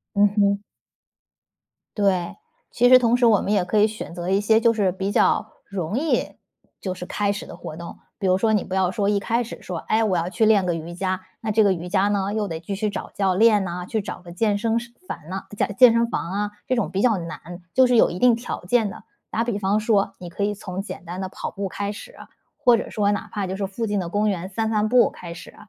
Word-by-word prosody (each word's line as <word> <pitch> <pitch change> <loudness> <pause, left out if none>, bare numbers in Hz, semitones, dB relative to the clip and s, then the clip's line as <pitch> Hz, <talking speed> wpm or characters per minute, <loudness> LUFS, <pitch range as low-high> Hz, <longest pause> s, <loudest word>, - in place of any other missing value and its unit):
嗯 205 +1 +6
哼。 200 0 +3 1.4
对， 195 -1 +1 0.3
其 245 +1 +3
实 255 - +9
同 245 -1 +3
时 245 - +3
我 215 -4 +5
们 205 - -2
也 195 -4 +2
可 210 +4 0
以 210 - +5
选 215 -5 -7
择 175 +1 -4
一 195 +1 +3
些 220 +2 +3
就 230 -1 +4
是 200 -4 +1
比 190 +2 -3
较 - - +2 0.2
容 195 +1 -3
易 320 0 0 0.4
就 185 -2 -3
是 180 -1 -7
开 205 +1 0
始 195 - -6
的 - - -10
活 155 - -8
动， 170 +1 -9 0.2
比 200 - -4
如 185 0 +4
说 220 +2 +2
你 210 - +2
不 185 - -7
要 185 -1 +2
说 200 0 0
一 205 - +2
开 230 +4 0
始 230 - -9
说， 180 -2 -5
哎， 220 +6 +1
我 190 -5 +1
要 170 +1 -1
去 190 +5 +1
练 205 -4 +4
个 175 - +1
瑜 165 +1 -6
伽， 185 +1 -2 0.2
那 215 -1 -2
这 220 +1 +4
个 195 - +4
瑜 175 +1 -6
伽 195 +1 +2
呢， 200 0 0
又 215 -1 -1
得 165 -2 -5
继 195 +3 -4
续 210 +1 -1
找 205 - -6
教 190 -2 +1
练 210 -1 +4
呐， 175 0 -5
去 220 +3 -2
找 195 - -7
个 175 -1 -11
健 205 +3 +1
身 225 +2 +1
室 235 0 -11
房 155 - -7
呐 190 +1 -5
健 205 - -1
健 250 -2 +9
身 235 0 +2
房 185 -6 -3
啊， 205 +1 -2 0.2
这 255 - +1
种 235 -5 0
比 195 - -1
较 230 -5 +3
难， 170 +1 -8
就 260 0 +6
是 245 -1 +3
有 - - +5
一 175 - -5
定 245 +1 +5
条 235 -5 -6
件 220 +1 +2
的。 - - -10 0.3
打 230 - 0
比 235 -4 -2
方 200 +2 +1
说， 210 -2 +1
你 175 - -8
可 200 +4 -4
以 205 - +1
从 190 -2 -5
简 195 - -8
单 175 +2 -6
的 190 - -3
跑 - - -6
步 200 -1 -4
开 200 +2 -3
始， - - -10 0.4
或 245 -1 +5
者 - - -5
说 205 -1 +1
哪 205 - -3
怕 200 -2 -2
就 190 - -3
是 195 - -1
附 225 +4 -4
近 205 -2 -1
的 175 - -3
公 210 +3 +1
园 185 -2 -2
散 220 +3 -1
散 215 -1 +1
步 245 -1 +5
开 170 -1 -9
始。 175 - -11
200 Hz, 280 characters per minute, -23 LUFS, 185-220 Hz, 1.4 s, 实